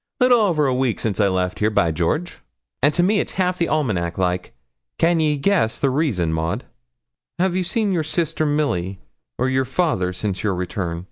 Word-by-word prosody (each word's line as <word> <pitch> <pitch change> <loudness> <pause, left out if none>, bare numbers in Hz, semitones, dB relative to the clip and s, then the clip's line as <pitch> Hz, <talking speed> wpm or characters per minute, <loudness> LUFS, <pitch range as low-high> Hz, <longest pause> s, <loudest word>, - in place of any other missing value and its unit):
'Little 250 -2 +5
over 170 -9 +2
a 130 - +2
week 125 -3 0
since 110 -2 -2
I 100 - +4
left 90 -1 -1
here, 105 - +2
by 85 -6 +2
George; 90 - -2 0.4
and 145 +3 +4
to 175 - +3
me 205 +3 +3
it's - - -3
half 180 -1 0
the 170 - +1
almanac 100 - -1
like; 90 -4 -1 0.4
can 170 0 +3
ye 150 -2 +2
guess 140 - +1
the 135 - +1
reason, 115 - 0
Maud?' 80 +9 -2 0.7
'Have 180 0 +1
you 185 - +1
seen 205 +3 0
your 175 -3 +1
sister, 155 0 -1
Milly, 140 - -1 0.4
or 130 - +1
your 130 0 +1
father, 130 - 0
since 95 +1 -3
your 100 -3 0
return?' 90 -1 -3
130 Hz, 195 wpm, -21 LUFS, -, 0.7 s, Little